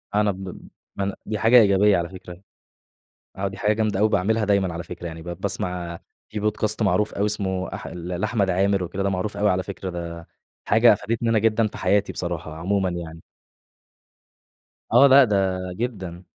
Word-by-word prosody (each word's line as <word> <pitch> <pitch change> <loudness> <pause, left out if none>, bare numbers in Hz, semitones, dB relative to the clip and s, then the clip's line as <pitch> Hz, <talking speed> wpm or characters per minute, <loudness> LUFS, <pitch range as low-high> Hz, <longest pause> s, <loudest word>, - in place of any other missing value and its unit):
أنا 105 0 +3
ب 95 0 -8
ب 95 -2 -9 0.3
أنا 100 0 -1
دي 105 -1 -3
حاجة 115 +4 +4
إيجابية 100 -1 +4
على 85 0 -2
فكرة. 90 -1 -11 1.0
آه، 100 +1 -1
دي 95 - -9
حاجة 105 +1 +1
جامدة 110 -2 0
أوي 110 - +4
باعملها 110 +3 +1
دايمًا 100 -3 +1
على 85 - -4
فكرة 85 +1 -8
يعني 80 -1 -7
ب 85 - -10
باسمع 85 -2 -3 0.3
في 105 - -5
Podcast 105 +1 0
معروف 105 +1 +1
أوي 100 - 0
اسمه 95 -4 -2
أح - - -7
ل 85 0 -7
لأحمد 100 +2 0
عامر 95 +1 +1
وكده، 95 +3 -4
ده 100 - +1
معروف 95 +2 -3
أوي 105 +1 +2
على 95 0 +1
فكرة، 95 -1 -6
ده 85 -1 -7 0.4
حاجة 115 +2 +6
أفادتني 115 +3 -1
أنا 110 - +3
جدًا 110 +1 +2
في - - -7
حياتي 100 0 +1
بصراحة 85 -3 -5
عمومًا 95 +3 0
يعني. 80 -2 -7 1.7
آه 140 - +7
لأ 140 +1 +8
ده 105 -4 +1 0.4
جدًا. 95 -5 -5
100 Hz, 185 wpm, -23 LUFS, 90-105 Hz, 1.7 s, لأ